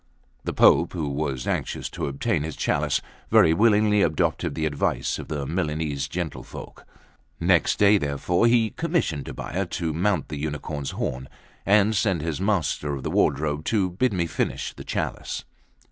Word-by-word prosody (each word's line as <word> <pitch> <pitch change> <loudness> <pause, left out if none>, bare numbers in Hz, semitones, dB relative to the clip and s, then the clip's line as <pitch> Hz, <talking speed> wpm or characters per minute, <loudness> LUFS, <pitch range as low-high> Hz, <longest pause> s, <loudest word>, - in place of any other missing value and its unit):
The - - -1
Pope, 85 - +5
who 80 -5 -2
was 70 -3 -2
anxious - - -2
to - - -3
obtain 70 +1 -1
his 80 0 -4
chalice, - - 0 0.3
very 80 - +6
willingly 105 +1 +4
adopted 80 -5 0
the 80 - -1
advice 75 -2 -1
of - - -7
the 75 -3 -3
Milanese 75 -3 -2
gentlefolk. 85 -3 -7 0.5
Next 85 0 +3
day, 105 0 +5
therefore, 70 +8 +1
he 115 -2 +3
commissioned 160 - -1
Tobbia 95 0 -3
to 85 -2 -2
mount 95 +5 0
the 75 -1 -5
unicorn's 75 -1 -4
horn, 65 +1 -4 0.4
and 105 +2 +4
sent 95 -6 +1
his 85 +1 -3
Master 80 -7 0
of 65 - -7
the - - -2
Wardrobe 75 +1 +1
to 95 -5 +1
bid 125 +8 +1
me 90 -4 0
finish 85 - -2
the - - -10
chalice. - - -3
80 Hz, 160 wpm, -25 LUFS, 75-100 Hz, 0.5 s, very